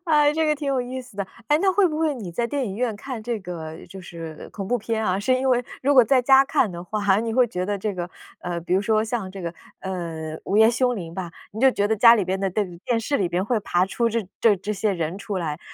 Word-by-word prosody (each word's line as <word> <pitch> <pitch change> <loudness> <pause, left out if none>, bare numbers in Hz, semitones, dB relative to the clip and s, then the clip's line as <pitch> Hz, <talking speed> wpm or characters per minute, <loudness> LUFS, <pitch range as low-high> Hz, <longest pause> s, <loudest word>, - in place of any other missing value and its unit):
哎， 300 -3 +4
这 315 0 +1
个 305 - +3
挺 295 -1 -6
有 265 -2 +1
意 255 +1 -5
思 250 -5 -15
的。 200 -2 -2 0.2
哎， 295 +1 +4
那 385 0 +4
会 390 0 +4
不 310 -2 -2
会 315 -3 +1
你 205 -8 -7
在 235 +7 -1
电 275 +1 -2
影 195 - -5
院 240 -2 -1
看 250 -1 -6
这 235 0 -2
个 165 -3 -7
就 190 +2 -9
是 165 -4 -9
恐 195 -2 -6
怖 245 +4 +1
片 220 +1 -2
啊， 185 -1 +1
是 255 +5 +2
因 260 +1 0
为 245 -1 +3 0.2
如 280 +2 +3
果 255 - +9
在 260 +2 +4
家 270 +1 +6
看 265 -7 +1
的 175 0 -7
话， 205 +1 +1
你 230 -1 -2
会 250 -1 +5
觉 180 -5 -3
得 205 0 -1
这 205 +1 -2
个， 175 -1 -4 0.3
呃， 175 -1 -3
比 170 - -4
如 190 - +3
说 215 +1 +2
像 220 -4 -3
这 195 0 -8
个， 170 0 -3 0.3
呃， 165 -4 -5
《午 200 - 0
夜 220 +1 +7
凶 245 0 +1
铃》 165 -3 -6
吧， 180 -3 -5 0.2
你 220 - -6
就 265 0 +6
觉 205 -4 0
得 220 - +1
家 230 +2 +8
里 205 -5 +1
边 190 +1 -1
的 195 - +1
电 185 -3 -3
电 235 -2 +1
视 280 +6 -1
里 185 - +1
边 175 +2 -1
会 225 +1 +1
爬 180 -2 +1
出 235 +4 0
这 225 -4 -2
这 215 -3 +5
这 200 +3 -4
些 205 0 0
人 170 0 -3
出 200 -1 -4
来。 160 -3 -3
215 Hz, 300 characters per minute, -23 LUFS, 185-250 Hz, 0.3 s, 果